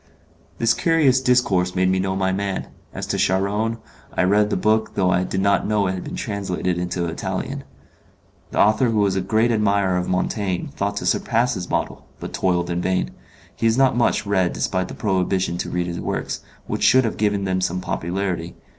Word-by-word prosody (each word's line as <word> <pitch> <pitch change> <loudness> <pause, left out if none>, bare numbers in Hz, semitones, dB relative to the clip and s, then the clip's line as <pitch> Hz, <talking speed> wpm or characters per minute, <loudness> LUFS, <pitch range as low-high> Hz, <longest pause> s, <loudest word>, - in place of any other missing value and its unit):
This 115 0 +3
curious 150 -6 +3
discourse 100 -9 +2
made 95 0 +2
me 95 0 +2
know 95 0 -1
my 95 -1 +1
man. 100 0 -2 0.2
As - - -5
to - - -2
Charron, 105 +4 +1 0.3
I - - 0
had 90 - +3
read 105 0 +3
the - - 0
book 110 +3 +1
though 90 -2 +2
I 90 0 +2
did 95 +1 -2
not 100 0 +2
know 105 -1 +2
it 95 - +1
had 95 - -5
been - - -6
translated 95 -4 -2
into 90 0 -2
Italian. 80 - -4 0.9
The - - -6
author 110 +4 +4
who 110 - 0
was 100 -2 +2
a 95 - +1
great 110 +5 +2
admirer 100 -4 +2
of 90 - -2
Montaigne 95 0 -1
thought 100 +1 -2
to - - -3
surpass 120 +1 +1
his 90 -4 -5
model, - - -2
but - - -7
toiled 90 -2 0
in 85 0 -1
vain. 90 -10 0 0.4
He 115 - +1
is 115 +2 +2
not 135 -2 +4
much 120 -3 +1
read 95 -3 +1
despite 95 -1 -1
the - - -8
prohibition 95 -3 0
to - - -3
read 90 0 -1
his 85 -1 -4
works, - - -3 0.3
which - - -3
should 130 0 +5
have 115 - -2
given 105 -1 +1
them 95 -1 0
some 90 0 -1
popularity. 90 -1 -3
95 Hz, 205 wpm, -22 LUFS, 90-105 Hz, 0.9 s, should